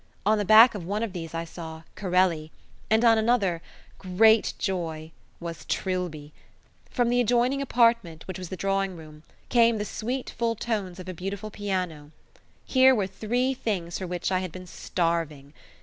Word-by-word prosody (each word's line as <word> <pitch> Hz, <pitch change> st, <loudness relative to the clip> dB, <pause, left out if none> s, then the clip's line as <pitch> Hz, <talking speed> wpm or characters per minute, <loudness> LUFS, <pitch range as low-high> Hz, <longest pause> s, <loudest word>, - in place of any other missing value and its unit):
On 215 Hz, +1 st, +3 dB
the 205 Hz, -, -1 dB
back 220 Hz, +5 st, +8 dB
of 205 Hz, -5 st, -6 dB
one 205 Hz, +6 st, -2 dB
of 220 Hz, -5 st, -4 dB
these 165 Hz, -3 st, -6 dB
I 165 Hz, 0 st, -3 dB
saw 160 Hz, -1 st, -9 dB
"Corelli", 180 Hz, -5 st, +1 dB, 0.4 s
and 220 Hz, +2 st, +3 dB
on 225 Hz, -1 st, +6 dB
another 210 Hz, -7 st, +1 dB, 0.4 s
great 220 Hz, +4 st, +4 dB
joy! 165 Hz, -5 st, -3 dB, 0.3 s
was 170 Hz, -1 st, -7 dB
Trilby. 175 Hz, -6 st, -3 dB, 0.6 s
From 245 Hz, -2 st, +1 dB
the 245 Hz, +1 st, +3 dB
adjoining 245 Hz, +4 st, +2 dB
apartment, 230 Hz, -, +1 dB
which 185 Hz, -1 st, -6 dB
was 180 Hz, -2 st, -7 dB
the 185 Hz, -, -6 dB
drawing 195 Hz, +1 st, -1 dB
room, 155 Hz, -1 st, -13 dB, 0.3 s
came 235 Hz, -2 st, +4 dB
the 210 Hz, -, -3 dB
sweet 245 Hz, +5 st, -4 dB
full 230 Hz, -1 st, -1 dB
tones 205 Hz, -6 st, -3 dB
of 185 Hz, -, -9 dB
a 185 Hz, -, -4 dB
beautiful 195 Hz, +4 st, -5 dB
piano. 180 Hz, -8 st, -3 dB, 0.6 s
Here 260 Hz, 0 st, +5 dB
were 205 Hz, -4 st, 0 dB
three 240 Hz, +7 st, -1 dB
things 185 Hz, -9 st, -3 dB
for 185 Hz, -, -4 dB
which 180 Hz, +1 st, -3 dB
I 185 Hz, -, +2 dB
had 185 Hz, -2 st, -5 dB
been 185 Hz, +2 st, -9 dB
starving. 165 Hz, -5 st, -2 dB
190 Hz, 170 wpm, -26 LUFS, 170-225 Hz, 0.6 s, back